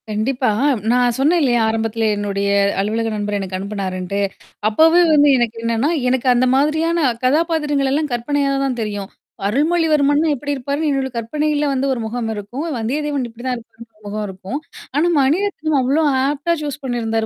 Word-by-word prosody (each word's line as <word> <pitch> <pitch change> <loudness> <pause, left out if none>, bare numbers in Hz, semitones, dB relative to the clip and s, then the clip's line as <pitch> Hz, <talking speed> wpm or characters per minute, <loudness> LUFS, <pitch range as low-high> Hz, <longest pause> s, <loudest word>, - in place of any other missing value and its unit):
கண்டிப்பா. 245 +5 0 0.4
நா 245 - +3 0.2
சொன்னேன் 315 +6 +3
இல்லையா 245 -4 +2
ஆரம்பத்துலேயே? 225 -1 0
என்னுடைய 200 -1 -1 0.3
அலுவலக 225 +3 0
நண்பர் 205 0 -2
எனக்கு 190 -1 -4
அனுப்புனாருன்ட்டு. 195 -1 -3 0.5
அப்பவே 325 +10 +5
வந்து 295 -1 +5
எனக்கு 235 -2 -1
என்னன்னா, 230 +5 +1 0.2
எனக்கு 260 0 0
அந்த 245 +1 +3
மாதிரியான 315 +4 +1 0.3
கதாபாத்திரங்களல்லாம் 295 -1 +1
கற்பனையாகத் 275 +3 0
தான் 255 -3 -2
தெரியும். 205 -2 -5 0.4
அருள்மொழி 315 +10 +1
வர்மன்னா 290 +1 +3
எப்படி 290 +2 -5
இருப்பார்ன்னு 280 +3 -2
என்னோட 270 -2 0
கற்பனையில 295 +5 -1
வந்து 270 0 0
ஒரு 255 - -1
முகம் 225 +1 -3
இருக்கும், 220 +8 -5
வந்தியதேவன் 275 +4 -2
இப்படி 230 +1 -13
தான் 255 -1 0
இருக்கணும்ன்னு 230 0 -14
ஒரு 215 - -26
முகம் 210 +1 -3
இருக்கும். 190 +8 -6 0.4
ஆனா 310 +4 +3
மணிரத்னம் 315 +1 +1
அவ்வளோ 270 +5 +2 0.2
ஆப்ட்டா 290 +4 0
சூஸ் 295 -1 -4
பண்ணிருந்தார். 225 -3 -1
260 Hz, 155 wpm, -19 LUFS, 220-295 Hz, 0.5 s, அப்பவே